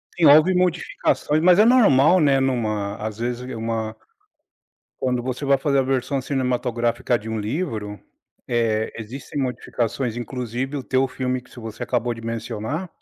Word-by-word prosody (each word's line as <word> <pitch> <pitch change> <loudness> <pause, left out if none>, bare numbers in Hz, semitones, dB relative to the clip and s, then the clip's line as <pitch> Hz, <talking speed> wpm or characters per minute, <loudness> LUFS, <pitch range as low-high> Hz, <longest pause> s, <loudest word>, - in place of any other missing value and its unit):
Sim, 175 - +2
houve 155 +5 +7
modificações, 175 -3 0
mas 180 +2 +6
é 215 - +7
normal, 185 - +5
né, 140 -4 +4
numa 110 -6 -1
às 110 -1 -5
vezes 120 +1 -2
uma 115 -1 -3 1.0
quando 125 -2 -1
você 130 +3 -4
vai 140 0 +3
fazer 140 0 +1
a - - +4
versão 135 +1 -1
cinematográfica 125 -3 0
de 110 +2 -9
um 110 - -2
livro, 110 - -3 0.5
eh, 110 -2 0
existem 125 +5 -6
modificações 125 -1 -2
inclusive 125 +3 -4
o 135 - -3
teu 130 +1 +1
filme, 130 0 -2
que 125 - -23
se - - -14
você 110 -1 -7
acabou 120 +1 -1
de 115 - -10
mencionar 115 - -4
125 Hz, 155 wpm, -22 LUFS, 115-140 Hz, 1.0 s, houve